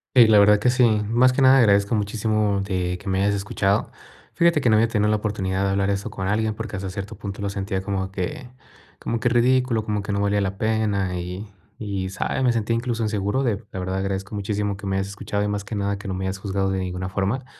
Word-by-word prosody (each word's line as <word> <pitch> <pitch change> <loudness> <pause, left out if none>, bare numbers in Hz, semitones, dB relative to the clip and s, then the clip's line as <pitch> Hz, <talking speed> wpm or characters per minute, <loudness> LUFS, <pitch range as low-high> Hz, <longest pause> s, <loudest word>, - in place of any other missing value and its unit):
Eh, 125 - +8
y - - +5
la 110 -1 +6
verdad 105 0 +6
que 125 - +2
sí. 125 +1 +3 0.2
Más 125 +3 +4
que 135 - 0
nada, 130 0 +7
agradezco 100 -2 +4
muchísimo 105 -1 0
de 90 -2 -2
que 105 - -12
me 95 0 +1
hayas 100 0 +2
escuchado. 100 0 0 0.4
Fíjate, 170 -3 +3
que 125 - +2
no 110 - +5
había 110 +2 +4
tenido 105 -2 +1
la 105 - +2
oportunidad, 95 -3 -2
de 100 - +1
hablar 100 0 +1
eso 100 0 -2
con 95 - -4
alguien, 110 +2 0
porque 110 0 -6
hasta 95 0 -4
cierto 100 +3 -6
punto 100 0 -6
lo 100 - -1
sentía 95 -1 -3
como 95 -1 -3
que 95 +6 -5 0.5
como 115 - -2
que 120 - +1
ridículo, 120 -1 +2
como 105 -1 -1
que 100 - -5
no 100 0 0
valía 100 0 +1
la 100 0 -2
pena. 105 -4 0
Y 90 +4 -6 0.3
y, 100 -4 -3
¿sabes?, 95 - -2
me 125 - +4
sentía 115 0 0
incluso, 115 -1 -2
inseguro 105 +4 0
de 115 -6 +1
La - - -7
verdad, 95 +1 -2
agradezco 95 +1 -3
muchísimo 100 0 -2
que 100 0 -7
me 95 - -1
hayas 95 0 -1
escuchado, 100 +1 -3
y - - 0
más 105 -1 -2
que 105 +2 -6
nada, 100 0 -1
que 100 - -8
no 95 - -3
me 95 0 -3
hayas 95 0 -3
juzgado 95 -1 -1
de 95 - -1
ninguna 90 0 -3
forma. 100 +7 -2
100 Hz, 250 wpm, -23 LUFS, 95-110 Hz, 0.5 s, Eh